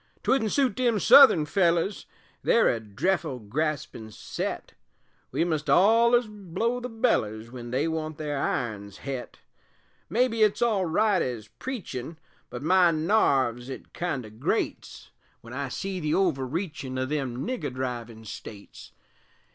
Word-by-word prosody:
'Twouldn't 225 -6 +2
suit 265 -7 +2
them 245 -3 +2
Southun 205 - +7
fellers, 175 +2 +1 0.3
They're 230 - +4
a 115 - 0
dreffle 125 - -1
graspin' 145 -3 -3
set, - - -5 0.6
We - - +1
must 155 -3 -2
ollers 235 +5 +5
blow 210 +4 -3
the 250 0 -5
bellers 115 - 0
Wen 120 -2 -8
they 135 +6 0
want 155 -1 -3
their 150 -3 -3
irons 105 -6 -3
het; 135 -3 -6 0.7
Maybe 230 -1 +1
it's 215 -1 +3
all 210 -6 +2
right 200 +2 +2
ez 115 -4 -4
preachin', 165 - -5 0.3
But 125 +2 -7
my 180 +2 +5
narves 140 - +1
it 135 - -9
kind 155 -8 -3
o' 110 - -11
grates, 110 - -3 0.3
Wen 115 +1 -11
I 140 0 -3
see 190 +7 -4
the 155 -2 0
overreachin' 150 -4 -1
O' 130 - 0
them 130 -3 -3
nigger 250 - -3
drivin' 120 -3 -5
States. 100 0 -10
155 Hz, 140 wpm, -26 LUFS, 125-205 Hz, 0.7 s, Southun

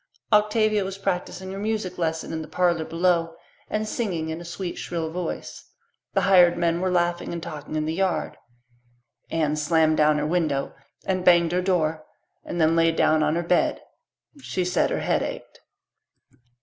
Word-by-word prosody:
Octavia 210 0 +3
was 190 0 -5
practising 190 -1 -3
her 195 - -6
music 210 -4 -3
lesson 160 -1 -2
in 160 - -3
the 155 - -8
parlour 175 -2 +1
below 165 -1 +1 0.3
and 215 0 -2
singing 180 -9 -2
in 160 +1 -5
a - - -8
sweet 175 +1 -5
shrill 165 -2 -4
voice. 175 0 -5 0.5
The 195 - +3
hired 180 -2 +5
men 170 0 +1
were 185 - +1
laughing 175 -1 0
and 170 -1 -5
talking 155 -2 -7
in 155 0 0
the 160 - -2
yard. 190 +1 -1 0.9
Anne 155 -2 0
slammed 155 +1 +2
down 150 0 +4
her 150 - -1
window 155 -4 0 0.3
and 185 -1 -1
banged 170 -2 +5
her 180 +1 +1
door 160 -4 0 0.4
and 175 - -5
then 160 0 +3
lay 165 0 +4
down 155 -1 +2
on 155 +1 +1
her 170 - -1
bed; 175 +1 +1 0.6
she 185 -7 -2
said 180 - +1
her - - -2
head - - +1
ached. - - -6
175 Hz, 175 wpm, -24 LUFS, 160-185 Hz, 0.9 s, hired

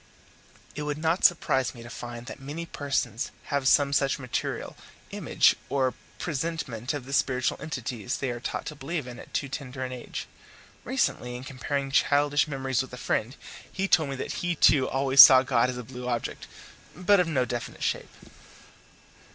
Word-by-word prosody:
It 150 - -5
would 150 0 -2
not 160 +3 0
surprise 135 -7 +3
me 115 - -10
to 120 - -10
find 120 0 -7
that - - -8
many 145 +5 -6
persons 135 -7 -2 0.2
have 140 -2 +1
some 140 +1 +4
such 140 -1 +2
material 125 -3 -4 0.4
image - - +3
or 130 -2 +1 0.2
presentment 145 -6 -3
of 135 -4 -6
the 135 - -7
spiritual 125 -2 +1
entities 125 -5 -4
they 135 -2 -2
are 120 - -5
taught - - -4
to 150 - -6
believe 150 +1 -4
in 125 -1 -9
at - - -12
too 140 - -1
tender 130 -1 -5
an 130 - -6
age. 125 -1 -6 0.6
Recently, 125 0 -1
in 125 - -7
comparing 135 +1 -3
childish 145 +2 +3
memories 135 -3 -1
with 130 - -8
a - - -6
friend, 120 +1 -1 0.4
he 195 +1 -1
told 160 -6 +3
me 135 - -3
that 130 - -4
he 175 -1 0
too 140 -3 +4
always 135 0 +7
saw 130 0 +10
God 125 -2 +2
as 125 - -4
a 125 - -5
blue 125 +1 -8
object, 120 -2 -3 0.5
but 185 +2 +4
of 180 - +2
no 135 -6 +1
definite 120 0 -5
shape. - - -1
135 Hz, 180 wpm, -27 LUFS, 125-145 Hz, 0.6 s, saw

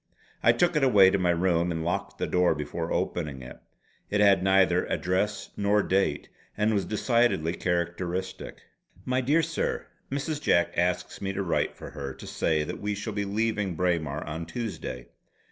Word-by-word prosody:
I - - +6
took 175 -1 +2
it 150 - +2
away 100 -8 +6
to 100 - +1
my 90 -1 +1
room 85 0 +2
and 80 -1 -3
locked 85 - -2
the - - -1
door 90 0 +2
before 75 +3 -4
opening 70 -6 -2
it. 60 - -10 0.5
It 105 - 0
had 100 -2 +5
neither 95 -2 +3
address 95 +3 -1
nor 105 0 +2
date, 95 -6 0 0.3
and 105 +1 +2
was 100 -2 0
decidedly 115 -7 +1
characteristic: 90 +1 -3 0.4
"My 130 0 +1
dear 150 +6 +3
Sir: - - -2 0.3
Mrs. 145 +2 -2
Jack 85 -11 +2
asks 90 +1 -1
me 100 0 -2
to 100 +1 -2
write 85 - 0
for - - -9
her 70 -3 -6
to - - -11
say 80 -2 0
that - - -6
we 105 0 -1
shall 100 +2 -5
be 100 0 -2
leaving 105 -2 -1
Braemar 80 -4 0
on 80 +2 -5
Tuesday. 105 - -5
95 Hz, 175 wpm, -27 LUFS, 85-105 Hz, 0.5 s, I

